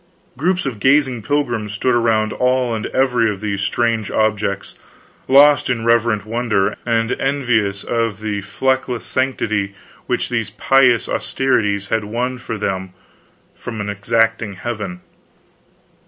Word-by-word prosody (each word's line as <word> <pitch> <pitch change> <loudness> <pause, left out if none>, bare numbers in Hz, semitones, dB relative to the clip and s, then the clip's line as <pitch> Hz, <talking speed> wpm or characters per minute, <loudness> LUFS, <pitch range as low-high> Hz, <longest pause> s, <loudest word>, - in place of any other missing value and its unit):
Groups 175 +6 0
of 125 -6 -4
gazing 130 -1 +3
pilgrims 120 -5 -1
stood 125 +4 +1
around 115 -2 +2
all 125 -1 +1
and 110 -1 -3
every 125 -4 +2
of 100 - -6
these 100 -1 -3
strange 115 +1 0
objects, 105 -2 -1 0.5
lost 140 +1 +6
in 115 -2 -1
reverent 115 -2 +2
wonder, 110 -3 0
and 115 0 +1
envious 120 -8 0
of 115 -3 -1
the 105 -2 -3
fleckless 130 +4 -1
sanctity 110 -7 -1 0.3
which 125 - -1
these 115 -4 -1
pious 125 +3 +3
austerities 105 -7 0
had 110 -2 0
won 125 +4 -3
for 115 -3 -5
them 95 -2 -3 0.6
from 115 -2 -7
an 105 -1 -3
exacting 115 +1 0
heaven. 100 -4 -5
115 Hz, 130 wpm, -19 LUFS, 105-125 Hz, 0.6 s, lost